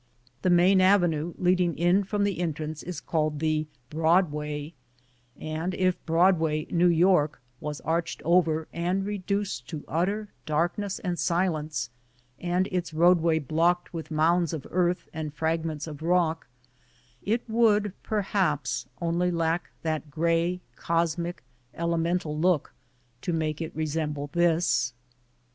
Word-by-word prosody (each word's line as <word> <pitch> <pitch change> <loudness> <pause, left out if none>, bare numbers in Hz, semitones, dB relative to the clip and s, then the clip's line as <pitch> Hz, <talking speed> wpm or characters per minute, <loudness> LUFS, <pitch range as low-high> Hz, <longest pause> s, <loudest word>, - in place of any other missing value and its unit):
The 185 - +1
main 180 +2 +5
avenue 175 -4 +3
leading 180 -2 +2
in 175 +4 +3
from 200 +1 -1
the 200 -3 0
entrance 155 -2 -3
is 180 0 -6
called 155 -2 -1
the 155 0 0 0.2
Broadway, 150 -2 +1 0.7
and 160 +4 -3
if 185 -1 0
Broadway, 165 -2 +3
jSTew 175 -1 +3
York, 170 -4 +3 0.2
was 150 0 -5
arched 165 +2 -1
over 165 -2 +3
and 180 +3 -1
reduced 200 -9 -3
to 150 -2 -6
utter 200 +7 -1 0.2
darkness 175 +6 0
and 180 -3 -3
silence, 155 -8 0 0.5
and 180 +2 +1
its 175 -3 -2
roadway 170 -1 +4
blocked 165 +5 +1
with 165 -2 -6
mounds 165 +1 +2
of 155 -5 -5
earth 180 0 +1
and 155 -2 -5
fragments 160 -1 -1
of 155 -2 -8
rock, 165 -1 +1 0.7
it 230 +4 -1
would 215 -3 +3
perhaps, 195 -8 -1
only 170 +1 +1
lack 165 0 0
that 155 -2 -2
gray, 170 +3 0
cosmic, 170 0 -1 0.3
elemental 170 -1 0
look, 165 -1 +1 0.5
to - - -2
make 155 -1 -1
it 160 +1 -5
resemble 150 -2 -2
this. 170 -6 +2
170 Hz, 125 wpm, -27 LUFS, 155-180 Hz, 0.7 s, main